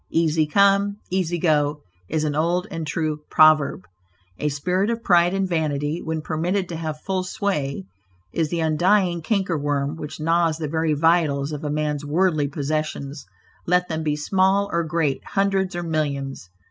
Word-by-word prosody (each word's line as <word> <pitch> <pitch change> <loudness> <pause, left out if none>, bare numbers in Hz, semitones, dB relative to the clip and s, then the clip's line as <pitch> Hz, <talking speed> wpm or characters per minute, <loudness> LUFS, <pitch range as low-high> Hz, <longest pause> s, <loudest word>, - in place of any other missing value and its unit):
"Easy 160 -1 +2
come, 200 +3 +3
easy 180 -2 0
go," 150 -3 +1 0.3
is 155 0 0
an 150 -1 0
old 170 +5 +1
and 165 -3 -4
true 155 -1 -1
proverb. 155 -9 +4 0.6
A 150 - 0
spirit 180 +8 0
of 230 0 -2
pride 175 -1 +4
and 195 -1 0
vanity, 155 -1 -1
when 160 -1 -3
permitted 175 +5 -1
to 170 - -4
have 155 -2 -4
full 190 -1 -1
sway, 150 - -2 0.5
is 160 -2 0
the 170 0 -1
undying 175 +3 +2
canker 185 -3 0
worm 145 0 -1
which 150 -1 -7
gnaws 165 0 +2
the 160 -2 -3
very 160 +1 0
vitals 155 -3 +2
of 150 0 -5
a 150 - -2
man's 150 -1 -1
worldly 155 -1 +1
possessions, 145 - -3 0.4
let 180 +1 +2
them 160 -1 -2
be 150 -2 0
small 190 +5 +1
or 170 0 +1
great, 160 -4 -1
hundreds, 195 -2 0
or 175 - -3
millions. 140 - -3
160 Hz, 165 wpm, -23 LUFS, 150-180 Hz, 0.6 s, proverb